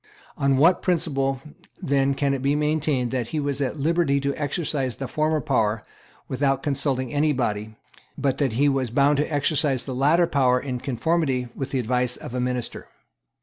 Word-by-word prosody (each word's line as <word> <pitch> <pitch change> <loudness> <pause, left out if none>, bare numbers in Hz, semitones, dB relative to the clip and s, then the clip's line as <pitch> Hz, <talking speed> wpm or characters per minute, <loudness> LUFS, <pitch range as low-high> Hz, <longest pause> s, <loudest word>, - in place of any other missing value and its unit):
On 140 -1 +2
what 165 +6 +4
principle 135 -7 0 0.4
then 140 0 +1
can 140 0 +1
it 135 - -2
be 140 +2 +1
maintained 150 -4 0
that 125 -3 -1
he 155 - -3
was 145 -1 -2
at 140 +2 -2
liberty 155 -2 +2
to 140 0 0
exercise 145 -3 -2
the 135 - -5
former 155 +3 0
power 115 -7 0 0.4
without 135 0 0
consulting 135 -3 -1
any 150 +1 +2
body, 110 -4 -2 0.4
but 135 -2 0
that 135 -6 +1
he 140 +5 +3
was 135 -3 +1
bound 140 +4 +3
to 150 +2 -1
exercise 145 -2 +1
the 130 - -4
latter 150 +7 +3
power 130 -6 +2
in 125 -2 -4
conformity 130 0 0
with 135 -1 -5
the 135 - -2
advice 125 0 0
of - - -9
a 125 - -2
minister? 125 -1 -3
135 Hz, 180 wpm, -24 LUFS, 125-150 Hz, 0.4 s, what